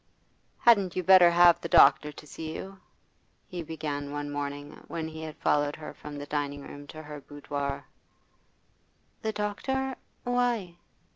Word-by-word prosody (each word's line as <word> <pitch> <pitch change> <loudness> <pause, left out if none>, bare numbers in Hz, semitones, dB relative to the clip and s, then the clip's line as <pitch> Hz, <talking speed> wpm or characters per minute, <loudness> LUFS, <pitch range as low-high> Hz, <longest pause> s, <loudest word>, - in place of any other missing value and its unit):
'Hadn't 200 -6 +5
you 185 - -1
better 185 -1 +8
have 175 0 +6
the 170 - -5
doctor 150 +1 +6
to 150 - -13
see 160 +1 -7
you?' 195 0 -8 0.7
he 180 -1 -6
began 150 -3 -4
one 145 0 -4
morning 145 0 -4 0.2
when 160 -1 -4
he 160 0 -8
had 155 -1 -7
followed 145 0 +1
her 155 -1 -8
from 150 -1 -9
the 145 - -6
dining 145 -1 -3
room 145 +1 -10
to 155 +1 -9
her 150 -1 -8
boudoir. 140 -1 -4 1.4
'The 220 0 -2
doctor? 260 +6 -2 0.3
Why? 240 -8 0
155 Hz, 150 wpm, -28 LUFS, 145-185 Hz, 1.4 s, better